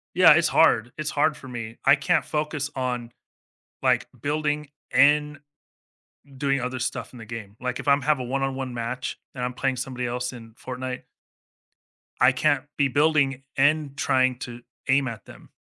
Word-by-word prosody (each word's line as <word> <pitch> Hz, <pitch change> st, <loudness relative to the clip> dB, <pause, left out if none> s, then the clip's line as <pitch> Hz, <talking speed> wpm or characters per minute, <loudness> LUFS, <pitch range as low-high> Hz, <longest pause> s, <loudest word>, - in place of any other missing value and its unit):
Yeah, -, -, +8 dB
it's -, -, +4 dB
hard, 115 Hz, +2 st, +4 dB
it's 155 Hz, 0 st, -3 dB
hard 150 Hz, +1 st, +2 dB
for 130 Hz, -, -11 dB
me. 115 Hz, -2 st, -6 dB
I -, -, +7 dB
can't 150 Hz, +2 st, +1 dB
focus 150 Hz, -1 st, -2 dB
on, 125 Hz, -2 st, -2 dB, 0.7 s
like, -, -, +2 dB
building 150 Hz, 0 st, -1 dB, 0.2 s
and 150 Hz, +1 st, +4 dB, 1.0 s
doing 140 Hz, -1 st, +1 dB
other 125 Hz, +1 st, -3 dB
stuff 130 Hz, +1 st, -4 dB
in -, -, -11 dB
the 110 Hz, -, -9 dB
game. 110 Hz, -3 st, -8 dB
Like, 125 Hz, 0 st, -3 dB
if -, -, -7 dB
I'm 140 Hz, 0 st, +4 dB
have 150 Hz, 0 st, +2 dB
a -, -, -3 dB
one-on-one 135 Hz, 0 st, -2 dB
match 120 Hz, +2 st, -4 dB, 0.2 s
and 125 Hz, -, -5 dB
I'm 125 Hz, 0 st, -2 dB
playing 135 Hz, -1 st, 0 dB
somebody 125 Hz, -1 st, -3 dB
else 125 Hz, +1 st, -3 dB
in 115 Hz, -2 st, -11 dB
Fortnite 125 Hz, +1 st, -6 dB, 1.2 s
I 125 Hz, +1 st, +6 dB
can't 135 Hz, 0 st, +1 dB
be 140 Hz, -1 st, +3 dB
building 140 Hz, -1 st, +2 dB
and 145 Hz, 0 st, +2 dB
trying 130 Hz, -3 st, +2 dB
to 120 Hz, -1 st, -7 dB, 0.3 s
aim 135 Hz, 0 st, +3 dB
at 115 Hz, -3 st, -7 dB
them. -, -, -15 dB
130 Hz, 170 wpm, -25 LUFS, 125-145 Hz, 1.2 s, Yeah